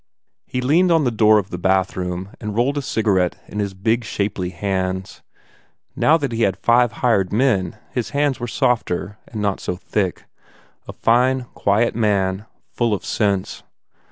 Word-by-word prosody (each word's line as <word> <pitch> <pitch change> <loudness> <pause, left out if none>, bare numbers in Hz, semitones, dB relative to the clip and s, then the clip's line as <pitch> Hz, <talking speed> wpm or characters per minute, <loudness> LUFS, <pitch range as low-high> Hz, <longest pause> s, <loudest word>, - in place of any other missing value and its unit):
He 125 - -2
leaned 165 +8 +3
in 165 -2 +4
the 125 - +1
door 110 -1 +5
of 100 -2 -2
the 90 - -4
bathroom 95 0 -1
and 105 -2 -4
rolled 125 +5 +1
a - - -3
cigarette 100 -8 +1
in 105 - -6
his 100 -2 -2
big, 115 +5 0
shapely 100 -4 -2
hands. 95 0 -3 0.7
Now 160 - +4
that 140 -5 -3
he 115 0 -2
had 95 -4 +2
five 120 0 +3
hired 100 -6 +2
men 110 -4 +1
his 125 -3 -2
hands 145 -2 0
were 120 - -3
softer 105 -4 -1
and 105 -2 -5
not 100 -2 0
so 90 - -3
thick. 95 0 -2 0.6
A - - -7
fine, 125 +3 +2
quiet 105 +4 +1
man, 100 -2 0 0.2
full 115 -3 +1
of - - -8
sense. 100 -3 -1
105 Hz, 165 wpm, -21 LUFS, 95-120 Hz, 0.7 s, door